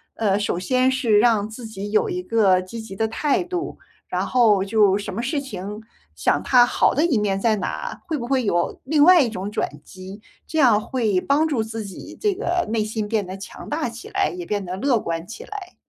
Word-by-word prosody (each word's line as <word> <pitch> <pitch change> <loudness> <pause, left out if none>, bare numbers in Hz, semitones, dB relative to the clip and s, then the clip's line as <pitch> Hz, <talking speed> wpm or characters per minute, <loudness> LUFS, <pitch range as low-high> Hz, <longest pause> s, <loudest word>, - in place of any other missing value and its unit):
呃， 205 -3 +1
首 205 -4 -1
先 255 +6 +2
是 245 -5 +2
让 215 -2 +3
自 225 +2 -9
己 205 -2 -6
有 215 - +2
一 360 0 -2
个 200 - +3
积 220 +5 -8
极 220 -3 -9
的 220 +3 0
态 285 +5 0
度， 355 0 -4 0.3
然 - - -1
后 220 -6 +4
就 205 -1 +3
什 205 - -6
么 225 - -3
事 285 +3 -1
情 210 -5 -7 0.4
想 - - +1
它 245 -2 +6
好 - - +2
的 305 +5 +2
一 285 -9 +2
面 200 -2 0
在 220 +1 +2
哪， 190 - -4
会 320 -4 -2
不 240 - -5
会 260 -1 +1
有 175 -4 -1
另 295 +3 +1
外 350 +1 +8
一 245 - +1
种 200 -1 -5
转 145 -7 -4
机。 190 +5 -11 0.2
这 320 - -2
样 230 -6 +5
会 215 -8 0
帮 300 +3 +2
助 260 -8 0
自 220 -1 -6
己 190 - -10
这 415 -2 +1
个 355 - -1
内 220 -1 0
心 215 -1 -3
变 215 -2 0
得 185 +1 -7
强 190 - -10
大 300 -3 -1
起 235 +1 -9
来， 390 0 +1
也 350 - -5
变 205 -2 -2
得 180 +1 -4
乐 240 +3 +1
观 165 -2 -4
起 460 - -9
来。 400 -3 -9
225 Hz, 240 characters per minute, -22 LUFS, 200-275 Hz, 0.4 s, 外